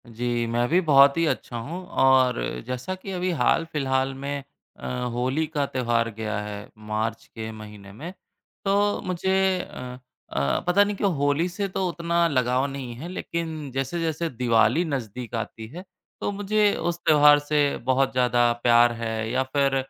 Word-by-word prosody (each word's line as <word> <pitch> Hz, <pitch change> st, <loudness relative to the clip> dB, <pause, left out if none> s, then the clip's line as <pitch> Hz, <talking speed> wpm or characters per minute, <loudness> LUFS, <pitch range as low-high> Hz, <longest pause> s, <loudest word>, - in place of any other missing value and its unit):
जी, 120 Hz, +1 st, -2 dB
मैं 120 Hz, +1 st, 0 dB
भी 175 Hz, -, +4 dB
बहुत 140 Hz, -3 st, +6 dB
ही 165 Hz, -, +3 dB
अच्छा 120 Hz, -, -3 dB
हूँ 165 Hz, +11 st, -6 dB, 0.2 s
और 130 Hz, -2 st, +5 dB, 0.3 s
जैसा 125 Hz, +8 st, -3 dB
कि 185 Hz, +1 st, -8 dB
अभी 185 Hz, 0 st, -1 dB
हाल-फिलहाल 135 Hz, -5 st, +1 dB
में 140 Hz, +1 st, -4 dB, 0.4 s
अ, -, -, -6 dB, 0.3 s
होली 130 Hz, +6 st, 0 dB
का 145 Hz, -2 st, -1 dB
त्यौहार 120 Hz, -3 st, 0 dB
गया 110 Hz, -1 st, -3 dB
है, 105 Hz, 0 st, -7 dB
मार्च 110 Hz, +1 st, -3 dB
के 110 Hz, -1 st, -5 dB
महीने 105 Hz, -2 st, -11 dB
में। 160 Hz, -, -8 dB, 0.5 s
तो 205 Hz, +1 st, +2 dB
मुझे 190 Hz, +1 st, +1 dB
अ 125 Hz, 0 st, -8 dB, 0.3 s
अ, 70 Hz, 0 st, +1 dB
पता 185 Hz, +3 st, +5 dB
नहीं 205 Hz, 0 st, -2 dB
क्यों 200 Hz, 0 st, +1 dB
होली 145 Hz, +4 st, +1 dB
से 200 Hz, +3 st, -3 dB
तो 190 Hz, 0 st, -2 dB
उतना 170 Hz, 0 st, +1 dB
लगाव 130 Hz, -3 st, +1 dB
नहीं 135 Hz, -3 st, -6 dB
है 145 Hz, +8 st, -7 dB
लेकिन 160 Hz, -5 st, -4 dB
जैसे-जैसे 160 Hz, +5 st, -2 dB
दिवाली 120 Hz, +4 st, +2 dB
नज़दीक 125 Hz, -5 st, -5 dB
आती 110 Hz, 0 st, -5 dB
है 170 Hz, +10 st, -9 dB, 0.4 s
तो -, -, -1 dB
मुझे 205 Hz, +1 st, +2 dB
उस 175 Hz, 0 st, -2 dB
त्यौहार 150 Hz, -1 st, +7 dB
से 145 Hz, -1 st, +1 dB
बहुत 130 Hz, +1 st, +2 dB
ज़्यादा 120 Hz, -1 st, +3 dB
प्यार 120 Hz, 0 st, +6 dB
है, 110 Hz, -1 st, -3 dB
या 130 Hz, +1 st, +1 dB
फिर 135 Hz, 0 st, +1 dB
135 Hz, 165 wpm, -25 LUFS, 120-170 Hz, 0.5 s, त्यौहार